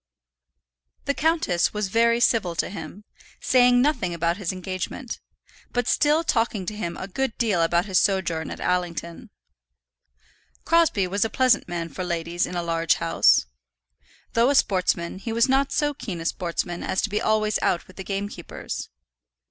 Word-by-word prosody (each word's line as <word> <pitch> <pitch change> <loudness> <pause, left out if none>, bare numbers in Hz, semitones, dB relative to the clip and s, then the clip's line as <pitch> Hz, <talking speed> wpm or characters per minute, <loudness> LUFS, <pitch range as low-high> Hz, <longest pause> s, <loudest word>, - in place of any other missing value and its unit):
The 280 - +1
countess 290 - +1
was 210 -2 -1
very 230 +2 +3
civil 220 -7 +2
to - - -1
him, 205 0 -8 0.4
saying 245 -1 +4
nothing 240 - 0
about 170 +1 0
his 195 -5 -2
engagement, 185 +6 -5 0.5
but 245 -1 0
still 300 +2 +3
talking 225 - 0
to 210 - -4
him 170 -5 -4
a 190 - -6
good 260 +4 -2
deal 210 -7 +1
about 170 +2 +2
his 190 -3 +2
sojourn 175 -5 0
at - - -7
Allington. 175 +2 -3 1.4
Crosbie 330 - +3
was 200 +4 0
a 225 - -1
pleasant 255 -2 +2
man 170 -1 -3
for 165 +4 -6
ladies 170 0 -2
in 180 - -7
a 175 - -1
large 165 -1 +1
house. 165 - +3 0.9
Though 235 +3 +4
a 285 - +2
sportsman, 185 -5 +1
he 225 +3 -5
was 230 +2 +3
not 270 +1 +2
so 295 -1 +1
keen 195 -10 -6
a 165 - -7
sportsman 175 0 -2
as 190 - -1
to - - 0
be 210 +1 0
always 215 -1 +1
out 175 - 0
with 185 - -18
the 190 - -5
gamekeepers. 195 -2 -5
195 Hz, 165 wpm, -24 LUFS, 175-235 Hz, 1.4 s, saying